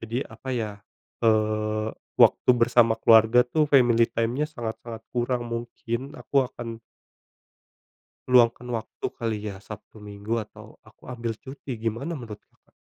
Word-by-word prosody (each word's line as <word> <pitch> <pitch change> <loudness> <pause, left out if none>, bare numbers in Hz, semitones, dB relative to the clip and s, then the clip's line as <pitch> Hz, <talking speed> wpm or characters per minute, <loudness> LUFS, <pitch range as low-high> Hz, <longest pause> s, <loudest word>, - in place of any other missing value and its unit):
jadi 115 +2 -3
apa 115 +4 -11
ya, 110 -3 -2 0.5
eee, 110 -1 +1 0.3
waktu - - +6
bersama 115 -1 +4
keluarga 115 +2 +6
tuh 150 +5 +1
family 120 -4 +5
time-nya 120 +6 0
sangat-sangat 115 -3 -6
kurang 120 0 0
mungkin 120 +3 -4
aku 135 -2 +1
akan 115 -2 -8 1.5
Luangkan 125 0 +4
waktu 110 -1 -6
kali 115 -2 -2
ya, 95 - -7
Sabtu, 105 0 -10
Minggu, 105 +1 -6
atau - - -14 0.2
aku - - -21
ambil 115 -2 -3
cuti, 135 0 -9
gimana 120 +9 -2
menurut 115 -8 -7
Kakak? - - -37
115 Hz, 130 wpm, -25 LUFS, 110-125 Hz, 1.5 s, waktu